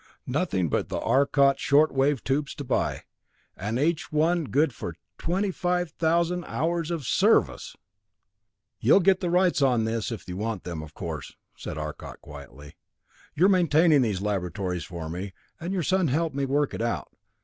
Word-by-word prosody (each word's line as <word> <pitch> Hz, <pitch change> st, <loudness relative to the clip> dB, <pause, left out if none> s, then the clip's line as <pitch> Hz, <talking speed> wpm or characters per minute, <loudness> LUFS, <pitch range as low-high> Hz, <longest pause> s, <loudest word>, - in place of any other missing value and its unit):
Nothing 125 Hz, -, 0 dB
but -, -, -1 dB
the -, -, -2 dB
Arcot 140 Hz, 0 st, +3 dB
short 150 Hz, +3 st, +3 dB
wave 135 Hz, 0 st, +1 dB
tubes 140 Hz, +2 st, -1 dB
to 145 Hz, -, -6 dB
buy 125 Hz, -, -1 dB, 0.5 s
and 105 Hz, +5 st, -3 dB
each 160 Hz, +3 st, 0 dB
one 160 Hz, +2 st, +2 dB
good 140 Hz, +1 st, +1 dB
for 85 Hz, -6 st, -6 dB, 0.2 s
twenty 190 Hz, +4 st, 0 dB
five 180 Hz, -2 st, -1 dB
thousand 170 Hz, +2 st, +1 dB
hours 165 Hz, +1 st, -1 dB, 0.2 s
service!" -, -, +2 dB, 1.0 s
"You'll -, -, +5 dB
get 190 Hz, 0 st, +3 dB
the 180 Hz, -, -2 dB
rights 180 Hz, -2 st, +2 dB
on 125 Hz, -4 st, +3 dB
this 110 Hz, +1 st, -2 dB
if 115 Hz, -, -7 dB
you 90 Hz, 0 st, -5 dB
want 110 Hz, -1 st, -3 dB
them, 85 Hz, -3 st, -5 dB
of 80 Hz, 0 st, -11 dB
course," 80 Hz, -6 st, -6 dB, 0.2 s
said -, -, -7 dB
Arcot 75 Hz, -1 st, -7 dB
quietly. 70 Hz, +4 st, -12 dB, 0.6 s
"You're 180 Hz, +5 st, +5 dB
maintaining 165 Hz, -5 st, +4 dB
these 105 Hz, -5 st, -1 dB
laboratories 95 Hz, -3 st, -2 dB
for 85 Hz, -4 st, -7 dB
me, 90 Hz, +4 st, -6 dB, 0.2 s
and 170 Hz, +2 st, -4 dB
your 190 Hz, -3 st, -1 dB
son 185 Hz, +1 st, +2 dB
helped 155 Hz, +2 st, 0 dB
me 140 Hz, -1 st, -1 dB
work 145 Hz, +1 st, +1 dB
it -, -, -4 dB
out. 115 Hz, 0 st, -3 dB
140 Hz, 165 wpm, -26 LUFS, 100-170 Hz, 1.0 s, You'll